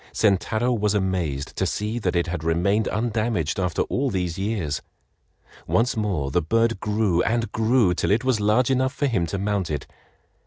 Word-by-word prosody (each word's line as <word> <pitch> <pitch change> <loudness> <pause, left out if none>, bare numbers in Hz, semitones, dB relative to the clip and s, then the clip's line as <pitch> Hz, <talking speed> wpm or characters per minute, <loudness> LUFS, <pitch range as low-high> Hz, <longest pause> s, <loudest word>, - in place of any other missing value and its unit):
Sentaro 110 +4 +1
was 105 -1 +1
amazed 90 -8 -1
to 95 - +1
see 105 +6 -2
that 95 -5 -1
it 85 - +2
had 85 -2 -4
remained 95 +6 +1
undamaged 110 -7 -1
after 90 -2 0
all 135 +1 -1
these 90 -5 -2
years. 95 -7 -2 0.9
Once 120 +2 +2
more 95 -11 -1
the - - +2
bird 115 +6 +1
grew 105 -4 +1
and 115 -1 0
grew 110 -4 +3
till - - -1
it 110 +4 +2
was 130 -4 +1
large 110 +5 +2
enough 130 0 +1
for 145 - 0
him 100 -11 0
to 100 - -3
mount 100 -2 -1
it. 75 -3 -3
105 Hz, 180 wpm, -24 LUFS, 90-115 Hz, 0.9 s, grew